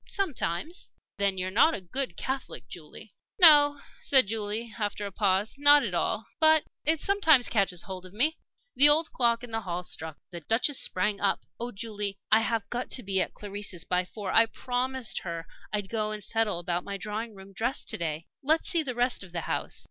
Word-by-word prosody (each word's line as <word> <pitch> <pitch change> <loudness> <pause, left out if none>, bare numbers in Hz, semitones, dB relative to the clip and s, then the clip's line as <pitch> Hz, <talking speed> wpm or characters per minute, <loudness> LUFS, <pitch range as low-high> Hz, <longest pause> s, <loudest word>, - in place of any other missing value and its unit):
"Sometimes." 325 - -3 0.3
"Then 200 -1 +2
you're 185 0 -3
not 275 +11 +4
a - - -4
good 185 +2 -4
Catholic, 260 - -4
Julie?" 160 - -10 0.3
"No," 290 -4 +8 0.2
said 265 -2 +5
Julie, 220 +2 -3
after 205 -1 -2
a 200 - -5
pause, 200 +1 +1
"not 290 0 +7
at - - -3
all. - - -1
But 315 -1 +5 0.2
it 315 +1 +2
sometimes 320 -9 +4
catches 195 -5 +1
hold 185 -2 -7
of - - -16
me." 285 +11 +1 0.4
The 290 +2 +7
old 315 +2 +3
clock 235 -1 +1
in 245 - -8
the 225 0 -2
hall 180 -2 -4
struck. 160 -3 -3
The 175 - -5
Duchess 235 - +1
sprang 200 +2 0
up. 200 - +1
"Oh, 240 +1 -4
Julie, 205 -2 -4
I 220 - +7
have 225 -2 -1
got 245 +1 -3
to 255 - -3
be 190 -1 +1
at - - -3
Clarisse's 205 -4 -6
by 180 0 0
four. 195 +1 -6
I 225 0 +6
promised 250 +1 -2
her 170 -2 -6 0.3
I'd 205 -2 -2
go 215 0 -2
and 210 -1 -5
settle 225 -2 0
about 175 +1 -2
my 200 0 -5
Drawing 215 +3 -5
room 195 0 -13
dress 235 +7 -2
to - - -1
day. 160 -1 -3 0.2
Let's 315 +4 +1
see 340 -3 +2
the 260 -5 -5
rest 245 +1 +1
of 185 -3 -10
the 170 - -2
house." - - -2
215 Hz, 200 wpm, -28 LUFS, 190-260 Hz, 0.4 s, No